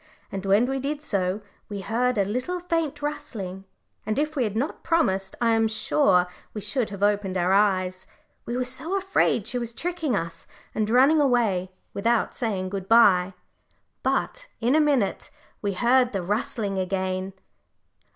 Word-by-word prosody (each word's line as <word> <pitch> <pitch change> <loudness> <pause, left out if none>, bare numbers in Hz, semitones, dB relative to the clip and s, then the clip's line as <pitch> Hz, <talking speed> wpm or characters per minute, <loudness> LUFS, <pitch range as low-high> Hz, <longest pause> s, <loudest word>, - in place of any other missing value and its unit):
And 195 0 -4
when 200 +5 +4
we 270 +1 -2
did 290 +2 -3
so 195 -4 0 0.3
we 200 -1 -5
heard 240 +4 0
a 200 - +3
little 255 - -2
faint 330 -4 -2
rustling, 195 -10 -5 0.4
and 215 +1 -2
if 305 +2 0
we 260 -4 +1
had 210 0 -3
not 275 +7 -2
promised 195 - +1
I 235 -1 +3
am 225 0 +3
sure 215 -3 +3 0.3
we 210 - -4
should 210 +3 0
have 200 -1 -5
opened 205 -2 +1
our 180 +1 +2
eyes, 185 -2 +1 0.4
we 240 +1 -2
were 255 - +1
so 265 +10 -2
afraid 385 - +1
she 250 - -2
was 235 -1 -5
tricking 325 -6 -1
us, 165 -2 -4 0.3
and 215 -1 -1
running 270 +6 +5
away 225 -9 +2 0.2
without 230 +3 +1
saying 200 -6 -2
good 195 -1 -5
bye. 195 -5 +5 0.7
But - - -1
in 240 +3 +2
a 310 - +5
minute 275 -10 +1 0.3
we 200 -1 -1
heard 245 +4 +3
the 195 -3 -2
rustling 210 0 -2
again. 185 0 -2
220 Hz, 165 wpm, -25 LUFS, 195-265 Hz, 0.7 s, running